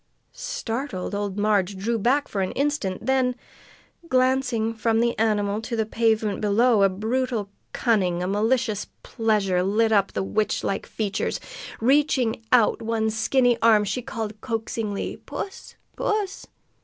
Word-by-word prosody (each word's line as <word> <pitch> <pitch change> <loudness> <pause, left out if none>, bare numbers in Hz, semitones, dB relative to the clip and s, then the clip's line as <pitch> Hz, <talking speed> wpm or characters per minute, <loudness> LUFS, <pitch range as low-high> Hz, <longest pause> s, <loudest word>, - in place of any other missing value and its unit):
Startled, 265 - -4
old 200 -1 -3
Marg 205 -2 +1
drew 225 +4 -1
back 270 +7 +2
for 200 - -2
an 185 - -2
instant; 275 -9 -1
then, 260 -1 +2 0.7
glancing 255 -3 +2
from 225 0 +1
the 235 0 +1
animal 210 -1 +1
to 235 +1 -4
the 220 -1 0
pavement 220 -2 +1
below, 215 +2 +3
a 195 - +5
brutal 220 +2 -2 0.2
cunning, 185 -7 +1
a - - -1
malicious 215 +2 0 0.2
pleasure, 210 -5 +1
lit 215 +4 +2
up 200 -2 +2
the - - -1
witch 215 +2 -1
like 195 - -2
features. 210 -3 -2 0.4
Reaching 255 -3 +2
out 240 -4 +4
one 220 -1 0
skinny 240 +2 +2
arm, 220 -2 +5
she 230 +5 -2
called 220 -4 -5
coaxingly: 225 -3 -3
"Puss! 390 - -7 0.2
Puss!" 415 -2 -2
225 Hz, 140 wpm, -24 LUFS, 205-250 Hz, 0.7 s, a